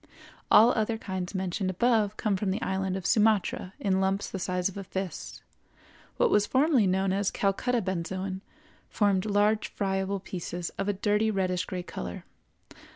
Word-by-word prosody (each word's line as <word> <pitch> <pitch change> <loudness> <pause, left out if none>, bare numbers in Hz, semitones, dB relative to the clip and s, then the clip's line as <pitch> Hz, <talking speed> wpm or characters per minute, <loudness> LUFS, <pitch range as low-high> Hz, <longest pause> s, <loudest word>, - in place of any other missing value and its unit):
All 230 +3 +7
other 225 0 0
kinds 190 -3 -5
mentioned 190 +1 -1
above 215 +1 +1
come 210 -2 0
from 190 +1 -1
the 190 +3 -1
island 190 0 -1
of 190 - -7
Sumatra, 210 -3 +2
in 190 -1 +1
lumps 195 +1 0
the 195 - -4
size 180 0 0
of 195 - -6
a 200 - -5
fist. 190 -1 -6 0.7
What - - +3
was 205 0 +3
formerly 265 -6 +3
known 190 +1 +1
as 200 0 +1
Calcutta 225 +4 0
benzoin 190 +1 -3 0.5
formed 200 -1 +1
large 210 +1 +2
friable 195 0 -2
pieces 175 -2 -5
of 195 - -1
a - - +2
dirty 210 +2 +1
reddish 185 -3 0
gray 180 -1 -5
color. 60 - -6
195 Hz, 160 wpm, -28 LUFS, 185-210 Hz, 0.7 s, All